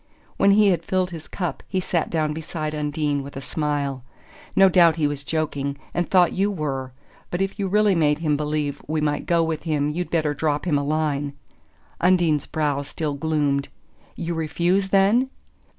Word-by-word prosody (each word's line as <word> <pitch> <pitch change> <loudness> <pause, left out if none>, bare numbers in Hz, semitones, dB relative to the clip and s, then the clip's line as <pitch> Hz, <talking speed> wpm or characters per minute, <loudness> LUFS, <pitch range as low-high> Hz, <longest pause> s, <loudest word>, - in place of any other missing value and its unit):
When 200 - +4
he 205 0 +6
had 170 -3 +1
filled 185 +1 0
his 165 -2 -8
cup 175 -7 -4
he 190 - -1
sat 175 -2 -1
down 155 -2 0
beside 155 -1 -4
Undine, 150 -1 -1
with 140 0 -9
a - - -3
smile. 140 -2 -2 0.5
"No 195 - +7
doubt 170 -3 +5
he 160 -3 0
was 145 -1 -2
joking 145 -3 -2 0.2
and 175 - -1
thought 180 -3 +4
you 195 +2 +1
were; 140 -8 -3 0.4
but 175 - -3
if 195 +1 -2
you 195 - 0
really 210 +1 +3
made 150 -4 +2
him 155 -2 0
believe 150 -1 -2
we 155 +1 -1
might 150 -1 -1
go 170 -1 +3
with 160 -1 -2
him 150 -3 0
you'd 175 +3 -3
better 155 -3 +1
drop 150 +1 -1
him 150 -5 +2
a - - -2
line." 145 -1 -1 0.7
Undine's 175 -5 +3
brow 145 -3 0
still 150 +1 -3
gloomed. 140 -2 0 0.5
"You 170 +1 -3
refuse, 175 +4 0
then?" 200 +7 +4
155 Hz, 180 wpm, -23 LUFS, 145-175 Hz, 0.7 s, No